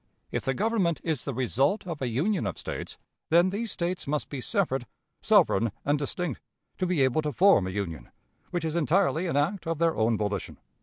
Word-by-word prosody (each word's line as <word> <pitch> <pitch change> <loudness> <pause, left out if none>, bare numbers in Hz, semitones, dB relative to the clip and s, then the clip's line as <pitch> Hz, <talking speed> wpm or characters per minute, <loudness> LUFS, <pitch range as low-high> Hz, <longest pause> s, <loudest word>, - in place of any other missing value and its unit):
If - - -2
the 135 - 0
Government 200 - +1
is 155 -7 -2
the 140 - -2
result 135 - +1
of 165 -5 -5
a 130 - 0
union 150 - 0
of 95 - -4
States, - - -6 0.3
then 175 +3 +5
these 220 +2 -2
States 175 -1 -2
must 150 +1 -1
be 140 -3 -5
separate, 135 - 0 0.4
sovereign, 115 +3 +4
and 145 +1 +2
distinct, 150 0 -3 0.4
to 185 - +1
be 175 -6 +2
able 130 +4 +2
to 150 -1 -2
form 180 - +5
a - - -2
union, 90 -9 -4 0.4
which 175 -2 -2
is 160 0 -2
entirely 170 +1 +2
an 155 - 0
act 165 +5 0
of 165 -1 -1
their 165 0 +2
own 110 0 +2
volition. 105 -2 -3
155 Hz, 200 wpm, -27 LUFS, 130-180 Hz, 0.4 s, then